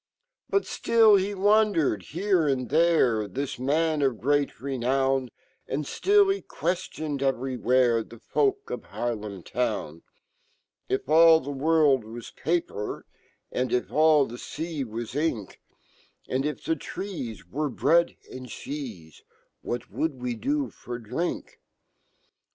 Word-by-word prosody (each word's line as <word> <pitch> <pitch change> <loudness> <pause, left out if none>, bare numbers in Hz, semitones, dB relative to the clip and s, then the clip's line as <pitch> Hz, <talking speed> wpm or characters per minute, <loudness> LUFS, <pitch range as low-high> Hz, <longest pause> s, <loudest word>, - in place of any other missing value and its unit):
Butftill 225 - +4
hewandered 200 - +2
here 180 - 0
and 130 -3 0
fhere*, 135 - +3
That 140 +3 -4
man 155 +3 +1
of 130 -5 +1
great 145 +1 +1
renown, 135 0 0 0.4
And 150 - -2
rtill 400 - +3
he 395 - -6
queftioned 155 -4 -3
everywhere, 125 -2 +2
The 115 - -14
folk 410 - 0
of - - -5
Haarlem 105 -6 -4
town: 80 +3 -2 0.4
" - - -45
If 130 - -1
all 160 +1 +7
fhe 140 +1 -5
world 145 -3 +3
was 115 +2 -9
paper, 160 -9 -2 0.5
And 125 0 -1
if 125 - 0
all 155 -2 +5
fhe 120 +2 -9 0.5
feawaj 115 +3 -6
ink, 145 -9 -2 0.7
And 135 +3 0
if 150 - -5
fhe 160 - -1
trees 125 - -6
were 150 +9 -2
bread 170 +5 +2 0.2
and 130 0 -8
cheeje, 115 - -8 0.4
What 120 0 -5
would 155 -5 -2
we 125 -1 -2
do 280 - -1
for 120 0 -7
drink? 125 +10 -4
140 Hz, 125 wpm, -26 LUFS, 120-165 Hz, 0.7 s, all